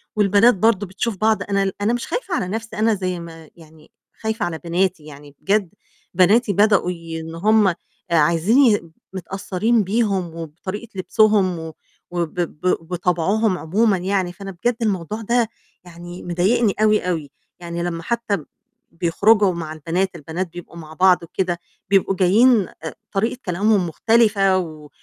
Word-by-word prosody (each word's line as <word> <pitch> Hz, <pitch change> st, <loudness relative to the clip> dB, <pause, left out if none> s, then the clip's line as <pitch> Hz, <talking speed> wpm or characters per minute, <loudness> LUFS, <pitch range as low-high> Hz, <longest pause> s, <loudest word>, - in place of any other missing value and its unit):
والبنات 210 Hz, +3 st, +4 dB
برضه 205 Hz, 0 st, +2 dB
بتشوف 195 Hz, +3 st, -3 dB
بعض، 220 Hz, +2 st, +1 dB
أنا 200 Hz, -1 st, 0 dB
ال 195 Hz, -1 st, -1 dB
أنا 215 Hz, +3 st, +1 dB
مش 240 Hz, -, -3 dB
خايفة 480 Hz, -7 st, -3 dB
على 185 Hz, -, -1 dB
نَفْسي، 225 Hz, +4 st, -5 dB
أنا 225 Hz, +1 st, +3 dB
زي 185 Hz, -3 st, -3 dB
ما 165 Hz, -2 st, -11 dB
يعني 160 Hz, -2 st, -18 dB, 0.3 s
خايفة 220 Hz, -1 st, -1 dB
على 165 Hz, -2 st, -4 dB
بناتي، 175 Hz, -1 st, -1 dB
يعني 145 Hz, -1 st, -13 dB
بجد 200 Hz, -2 st, +1 dB, 0.4 s
بناتي 200 Hz, +5 st, +4 dB
بدؤوا 205 Hz, -2 st, +3 dB
ي 165 Hz, -2 st, -7 dB
إن 160 Hz, +1 st, -8 dB
هم 210 Hz, +4 st, +3 dB
آآ 180 Hz, -, +1 dB, 0.4 s
عايزين 170 Hz, -, +3 dB, 0.2 s
متأثّرين 195 Hz, +4 st, -1 dB
بيهم 195 Hz, -4 st, -1 dB
وبطريقة 175 Hz, +7 st, -7 dB
لبسوهم 195 Hz, -2 st, +2 dB
و 160 Hz, 0 st, -7 dB, 0.4 s
وب 170 Hz, -3 st, -2 dB
ب 175 Hz, +1 st, 0 dB
وطَبعهم 180 Hz, +4 st, +1 dB
عمومًا 200 Hz, +5 st, +1 dB
يعني، 185 Hz, -1 st, -1 dB
فأنا 195 Hz, +2 st, -8 dB
بجد 225 Hz, +7 st, -1 dB
الموضوع 210 Hz, 0 st, -2 dB
ده 235 Hz, +1 st, +1 dB, 0.3 s
يعني 175 Hz, 0 st, -10 dB
مضايقني 190 Hz, +5 st, +1 dB
أوي، 215 Hz, -3 st, +3 dB
أوي. 155 Hz, -5 st, -3 dB, 0.3 s
يعني 170 Hz, 0 st, -5 dB
لمّا 170 Hz, -1 st, -4 dB
حتى 235 Hz, -1 st, -1 dB
ب 155 Hz, -, -11 dB, 0.5 s
بيخرجوا 195 Hz, +4 st, +3 dB
مع 165 Hz, -2 st, -5 dB
البنات، 170 Hz, +5 st, -2 dB
البنات 170 Hz, +4 st, -4 dB
بيبقوا 175 Hz, -1 st, -10 dB
مع 155 Hz, -1 st, -10 dB
بعض 180 Hz, +1 st, +4 dB
وكده، 175 Hz, +1 st, -2 dB, 0.3 s
بيبقوا 195 Hz, 0 st, +2 dB
جايين 205 Hz, +4 st, +4 dB, 0.2 s
آآ، 160 Hz, -, -6 dB, 0.2 s
طريقة 225 Hz, +4 st, -1 dB
كلامهم 190 Hz, +1 st, +1 dB
مختلفة 200 Hz, +1 st, +3 dB
و 155 Hz, -4 st, -6 dB
185 Hz, 155 wpm, -21 LUFS, 170-215 Hz, 0.5 s, والبنات